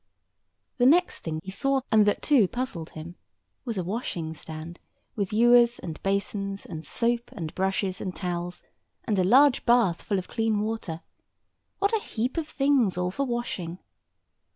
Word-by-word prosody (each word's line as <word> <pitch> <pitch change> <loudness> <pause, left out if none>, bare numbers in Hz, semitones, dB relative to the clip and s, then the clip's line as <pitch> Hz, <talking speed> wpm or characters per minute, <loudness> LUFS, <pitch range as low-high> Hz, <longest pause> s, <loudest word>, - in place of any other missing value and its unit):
The 245 -1 +4
next 355 +6 +4
thing 155 -1 -4
he 190 - -7
saw, 275 +6 +1
and 215 -2 +5
that 205 - +1
too 260 -10 +5
puzzled 240 -9 -4
him, 165 +3 -9 0.5
was 230 -4 -3
a 185 - -1
washing 175 -5 -3
stand, 160 +2 -8 0.4
with 200 -3 -2
ewers 240 +2 +5
and 160 -2 -7
basins, 200 0 -2
and 160 -1 -7
soap 235 0 +1
and 165 -6 -6
brushes, 190 0 -1
and 185 -2 -4
towels, 175 -1 -4 0.4
and 210 -4 0
a - - +4
large 260 +7 +5
bath 235 -8 +3
full 200 - -1
of 185 - -4
clean 225 -2 0
water—what 220 - -5
a 430 - -2
heap 245 +7 -3
of 320 -2 -1
things 270 -10 +2
all 180 0 0
for 275 +7 -2
washing! 200 -8 -3
205 Hz, 160 wpm, -26 LUFS, 180-245 Hz, 0.5 s, and